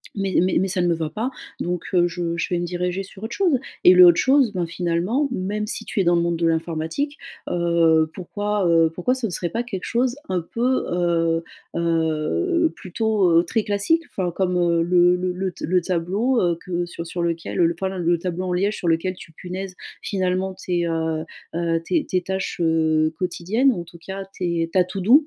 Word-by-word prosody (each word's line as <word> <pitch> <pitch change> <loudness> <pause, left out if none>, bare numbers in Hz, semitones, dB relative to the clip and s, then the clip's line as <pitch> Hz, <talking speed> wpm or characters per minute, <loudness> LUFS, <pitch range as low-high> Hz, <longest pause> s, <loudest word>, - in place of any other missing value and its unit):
mais 195 -2 +1
mais 185 +1 +2
mais, 190 - +1
ça 180 0 +1
ne 175 - +2
me 170 - +3
va 160 -1 -3
pas, 220 +10 -2 0.3
donc, 175 -1 -2
heu, 175 -1 +4
je 170 0 -3
je - - -2
vais 175 - +1
me 175 - -2
diriger 180 +2 -2
sur 195 +1 -13
autre 225 - -4
chose», 345 -10 +2 0.2
et 180 - +9
le 180 0 +9
autre 170 -1 +6
chose, 265 +1 +4
ben 180 -3 -1
finalement, 175 - 0
même 210 0 -2
si - - -4
tu - - -3
es - - +4
dans 175 - +4
le 170 - +2
monde 170 -1 0
de 165 - +1
l'informatique, 165 - -2 0.3
heu, 165 -2 +3
pourquoi, 205 +1 -2
heu, 165 -1 +4
pourquoi 180 +9 0
ce 255 -3 -2
ne 190 - -6
serait 175 0 -2
pas 235 +1 -2
quelque 195 -6 -6
chose 245 +1 0
un 185 -2 0
peu, 240 +9 0
heu, 170 -1 +1 0.3
heu, 170 - +1
plutôt, 200 -1 0
heu, 170 - +3
très 225 - 0
classique? 210 +11 +1
Enfin, 180 -2 -2
comme, 180 0 0
heu, 170 -1 +2
le 175 +1 +4
le 180 0 -2
le 185 +1 -2
t - - -6
le 180 +1 +3
tableau, 195 +9 0
heu, 175 -2 +1
que 175 -1 -2
sur 170 -1 -7
sur 175 +1 -4
lequel 165 -1 -2
l 170 -1 +4
enfin, 190 +3 -3
len 190 -1 -4
le 170 0 +2
tableau 180 +1 -3
en 180 - -1
liège 200 +4 0
sur 175 - -4
lequel 165 +3 +1
tu 170 - -13
punaises 185 +3 -6 0.3
finalement, 185 -1 -1
tes, 175 -2 -1
heu 160 -1 -1 0.3
heu, 165 -1 0
tes 320 -4 0
tes 185 - 0
tâches, 190 0 -3
heu, 160 -1 +2
quotidiennes, 190 +9 +1
ou 175 - -4
en - - -6
tout 170 0 -15
cas, 195 +2 -6
tes 170 -2 -1
ta 185 - +5
to-do 205 - +4
180 Hz, 220 wpm, -22 LUFS, 170-195 Hz, 0.3 s, et